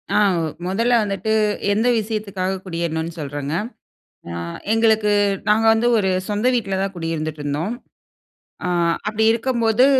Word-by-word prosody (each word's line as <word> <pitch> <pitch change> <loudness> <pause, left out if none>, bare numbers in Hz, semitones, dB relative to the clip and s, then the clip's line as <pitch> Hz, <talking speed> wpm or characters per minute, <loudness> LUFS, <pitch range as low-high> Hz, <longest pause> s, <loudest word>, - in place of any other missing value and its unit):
ஆ, - - +4 0.5
முதல்ல 230 +7 +1
வந்துட்டு, 200 +1 -2 0.4
எந்த 220 +4 +1
விஷயத்துக்காக 200 -3 -3
குடியேறணுன்னு 165 -2 -3
சொல்றேங்க. 145 0 -4 0.8
ஆ, - - -5 0.4
எங்களுக்கு 220 -2 +3 0.4
நாங்க 215 +2 +4
வந்து 225 +2 +2
ஒரு 190 -2 +1 0.2
சொந்த 210 +4 0
வீட்ல 195 -5 -1
தான் 195 0 -3
குடியிருந்துட்டு 160 -2 -3
இருந்தோம். 150 +9 -2 0.9
ஆ, - - 0 0.4
அப்படி 215 +1 0
இருக்கம்போது, 235 0 +2
200 Hz, 120 wpm, -21 LUFS, 170-220 Hz, 0.9 s, ஆ